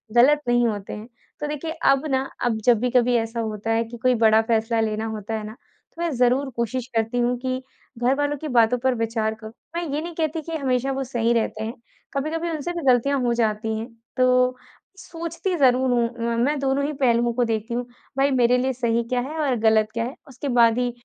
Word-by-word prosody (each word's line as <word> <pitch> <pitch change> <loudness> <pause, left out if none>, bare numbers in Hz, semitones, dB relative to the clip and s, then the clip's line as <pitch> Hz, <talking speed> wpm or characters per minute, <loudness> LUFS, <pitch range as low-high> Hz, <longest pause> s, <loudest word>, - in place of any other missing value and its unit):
गलत 290 +5 +6
नहीं 240 0 +3
होते 205 -3 -4
हैं। 215 +2 -8 0.3
तो 295 - -3
देखिए, 300 +2 -4
अब 275 -2 +2
ना 265 0 0 0.2
अब 225 -2 +1
जब 240 -3 +5
भी 250 +1 0
कभी 245 0 +3
ऐसा 225 +1 -2
होता 220 0 -3
है 225 +1 +2
कि 240 +1 -9
कोई 250 +2 +2
बड़ा 220 -1 +5
फैसला 225 0 +1
लेना 220 0 -1
होता 210 +1 -6
है 220 -1 -2
ना, 215 - -7 0.4
तो 340 - -7
मैं 340 - +1
ज़रूर 250 +3 +2
कोशिश 240 +1 -2
करती 225 +2 0
हूँ 245 +1 +1
कि 255 0 -2 0.4
घरवालों 290 +4 +1
की 310 - -4
बातों 245 -2 +3
पर 260 -1 +2
विचार 225 -1 -1
करूँ। 220 0 -11 0.2
मैं 345 - -1
ये 300 - -1
नहीं 345 +1 -6
कहती 320 0 -1
कि 330 +2 -6
हमेशा 265 -1 0
वो 270 0 -2
सही 235 -2 0
रहते 220 -1 -1
हैं, 225 +2 -4 0.4
कभी-कभी 320 +4 -2
उनसे 315 +2 -3
भी 340 - -4
गलतियाँ 275 +3 +2
हो 240 -1 +1
जाती 220 -1 0
हैं। 225 - -5 0.3
तो 255 0 +3 0.4
सोचती 340 +1 -4
ज़रूर 260 -1 +4
हूँ, 235 -1 +2 0.2
मैं 235 - 0
मैं 295 +1 +1
दोनों 275 +1 +1
ही 300 - -2
पहलुओं 235 -1 +3
को 245 +1 +1
देखती 225 +1 -2
हूँ, 245 0 -2 0.3
भाई, 275 +1 +3
मेरे 250 -1 +4
लिए 260 +1 0
सही 235 -1 0
क्या 250 - +1
है 320 - -6
और 255 - +2
गलत 220 -1 +4
क्या 230 0 -1
है, 255 - -6
उसके 270 +1 -7
बाद 230 0 +5
ही 245 -1 0
245 Hz, 220 wpm, -23 LUFS, 230-275 Hz, 0.4 s, गलत